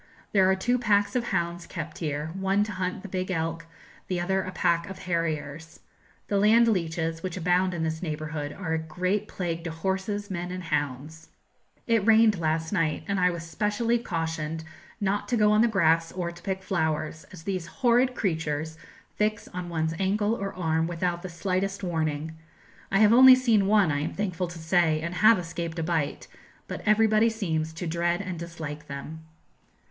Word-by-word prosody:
There 190 Hz, -2 st, +4 dB
are 190 Hz, -, +4 dB
two 245 Hz, +6 st, 0 dB
packs 205 Hz, -1 st, +2 dB
of 245 Hz, -1 st, +1 dB
hounds 170 Hz, -4 st, -2 dB
kept 155 Hz, 0 st, -6 dB
here, 150 Hz, -1 st, -3 dB
one 195 Hz, +2 st, +1 dB
to 210 Hz, -, -4 dB
hunt 185 Hz, -1 st, -3 dB
the -, -, -6 dB
big 185 Hz, 0 st, -3 dB
elk, 165 Hz, -1 st, -2 dB, 0.4 s
the 180 Hz, -2 st, -1 dB
other 190 Hz, +2 st, +1 dB
a 185 Hz, -, -5 dB
pack 170 Hz, 0 st, +1 dB
of 195 Hz, -, -7 dB
harriers. 160 Hz, -3 st, -3 dB, 0.5 s
The 200 Hz, -, +1 dB
land 225 Hz, +3 st, +5 dB
leeches, 165 Hz, -5 st, -1 dB
which 185 Hz, 0 st, -4 dB
abound 180 Hz, +1 st, +2 dB
in 165 Hz, -, -2 dB
this 160 Hz, 0 st, -2 dB
neighbourhood, 155 Hz, -3 st, -4 dB
are 170 Hz, -1 st, -4 dB
a 160 Hz, -, +1 dB
great 180 Hz, +6 st, -2 dB
plague 170 Hz, -2 st, -4 dB
to -, -, -2 dB
horses, 190 Hz, +5 st, -3 dB
men, 175 Hz, -1 st, -3 dB
and 185 Hz, 0 st, -5 dB
hounds. 150 Hz, 0 st, -3 dB, 0.6 s
It 230 Hz, -3 st, +2 dB
rained 220 Hz, -2 st, +5 dB
last 160 Hz, 0 st, -1 dB
night, 165 Hz, -5 st, 0 dB
and 200 Hz, -1 st, 0 dB
I 180 Hz, 0 st, +4 dB
was 170 Hz, -1 st, -4 dB
specially 210 Hz, +7 st, 0 dB
cautioned 160 Hz, -5 st, -3 dB, 0.4 s
not 205 Hz, 0 st, -1 dB
to 245 Hz, -, +1 dB
go 210 Hz, -1 st, +4 dB
on 210 Hz, +1 st, +4 dB
the 235 Hz, -, +5 dB
grass 165 Hz, -6 st, +2 dB
or 175 Hz, -2 st, -3 dB
to 175 Hz, +1 st, -14 dB
pick 190 Hz, +1 st, -3 dB
flowers, 160 Hz, -2 st, -2 dB
as 175 Hz, -3 st, -11 dB
these 185 Hz, -3 st, -3 dB
horrid 250 Hz, +2 st, +2 dB
creatures 160 Hz, -5 st, -2 dB, 0.4 s
fix 210 Hz, 0 st, 0 dB
on 180 Hz, -1 st, -6 dB
one's 160 Hz, -1 st, -1 dB
ankle 205 Hz, +3 st, +1 dB
or 200 Hz, -3 st, -3 dB
arm 160 Hz, -2 st, 0 dB
without 175 Hz, 0 st, -2 dB
the 185 Hz, -, -6 dB
slightest 195 Hz, +3 st, -2 dB
warning. 160 Hz, -2 st, -2 dB, 0.6 s
I 195 Hz, -, +3 dB
have 215 Hz, +1 st, +6 dB
only 260 Hz, +1 st, +10 dB
seen 230 Hz, -6 st, +3 dB
one, 205 Hz, -5 st, +4 dB
I 145 Hz, -, 0 dB
am 145 Hz, -, -3 dB
thankful 185 Hz, -3 st, -2 dB
to 175 Hz, 0 st, -9 dB
say, 160 Hz, -1 st, +2 dB
and 170 Hz, +2 st, -4 dB
have 220 Hz, +5 st, +6 dB
escaped 170 Hz, -1 st, -5 dB
a 165 Hz, -, -1 dB
bite; 160 Hz, -3 st, -1 dB, 0.4 s
but -, -, -5 dB
everybody 215 Hz, +1 st, +4 dB
seems 160 Hz, -8 st, -2 dB
to 160 Hz, +2 st, -5 dB
dread 170 Hz, +1 st, 0 dB
and 185 Hz, -4 st, -5 dB
dislike 160 Hz, -3 st, -7 dB
them. 155 Hz, +3 st, -8 dB
175 Hz, 185 wpm, -27 LUFS, 160-200 Hz, 0.6 s, only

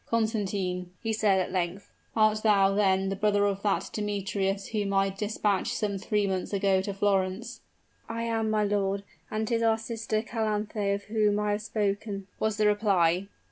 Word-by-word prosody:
"Constantine," 200 Hz, -5 st, -1 dB
he 225 Hz, -1 st, 0 dB
said, 210 Hz, -3 st, +3 dB
at 185 Hz, -, -2 dB
length, 185 Hz, +1 st, -2 dB, 0.2 s
"art 215 Hz, -1 st, +3 dB
thou, 195 Hz, -3 st, +4 dB
then, 195 Hz, -1 st, +2 dB
the 195 Hz, -, -1 dB
brother 205 Hz, 0 st, +2 dB
of 200 Hz, -1 st, -1 dB
that 200 Hz, -2 st, 0 dB
Demetrius 200 Hz, -1 st, -2 dB
whom 205 Hz, -3 st, -1 dB
I 195 Hz, 0 st, +2 dB
dispatched 210 Hz, +2 st, -1 dB
some 205 Hz, -2 st, -1 dB
three 210 Hz, +1 st, 0 dB
months 190 Hz, 0 st, -2 dB
ago 195 Hz, -1 st, +2 dB
to 200 Hz, -, -3 dB
Florence?" 195 Hz, +3 st, -1 dB, 0.5 s
"I 230 Hz, 0 st, -3 dB
am, 225 Hz, -1 st, 0 dB
my 215 Hz, -1 st, +2 dB
lord 200 Hz, -1 st, 0 dB, 0.3 s
and 215 Hz, 0 st, -2 dB
'tis 230 Hz, 0 st, +1 dB
our 225 Hz, -1 st, +3 dB
sister 225 Hz, -1 st, -2 dB
Calanthe 215 Hz, -3 st, -1 dB
of 200 Hz, -, -7 dB
whom 210 Hz, -1 st, +1 dB
I 210 Hz, 0 st, 0 dB
have 205 Hz, +1 st, -1 dB
spoken," 205 Hz, -1 st, -2 dB
was 220 Hz, -1 st, 0 dB
the 215 Hz, -, +2 dB
reply. 195 Hz, -4 st, +3 dB
205 Hz, 175 wpm, -28 LUFS, 195-215 Hz, 0.5 s, thou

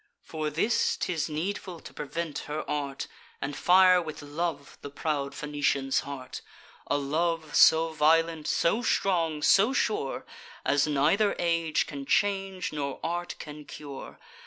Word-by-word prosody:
For 155 Hz, -1 st, -3 dB
this 170 Hz, +10 st, +1 dB
'tis 165 Hz, -2 st, -2 dB
needful 175 Hz, +2 st, -4 dB
to -, -, -11 dB
prevent 160 Hz, 0 st, -4 dB
her 155 Hz, +1 st, -4 dB
art, 140 Hz, -2 st, -3 dB, 0.3 s
And 140 Hz, +1 st, -4 dB
fire 185 Hz, +1 st, +6 dB
with 155 Hz, -2 st, -7 dB
love 145 Hz, -1 st, -4 dB
the 145 Hz, -, -7 dB
proud 140 Hz, -1 st, -2 dB
Phoenician's 145 Hz, -2 st, 0 dB
heart: 130 Hz, -2 st, -7 dB, 0.5 s
A 145 Hz, -, +1 dB
love 155 Hz, +2 st, -1 dB
so 160 Hz, +1 st, +6 dB
violent, 160 Hz, 0 st, +2 dB
so 205 Hz, +8 st, +2 dB
strong, 165 Hz, -9 st, +1 dB
so 210 Hz, +7 st, +5 dB
sure, 210 Hz, -, -1 dB, 0.4 s
As 145 Hz, +1 st, +3 dB
neither 155 Hz, +9 st, +2 dB
age 165 Hz, -2 st, +1 dB
can 140 Hz, -2 st, -7 dB
change, 195 Hz, -4 st, 0 dB
nor 140 Hz, -2 st, -3 dB
art 175 Hz, +1 st, -3 dB
can 150 Hz, 0 st, -9 dB
cure. 145 Hz, -2 st, -9 dB
155 Hz, 135 wpm, -28 LUFS, 145-175 Hz, 0.5 s, fire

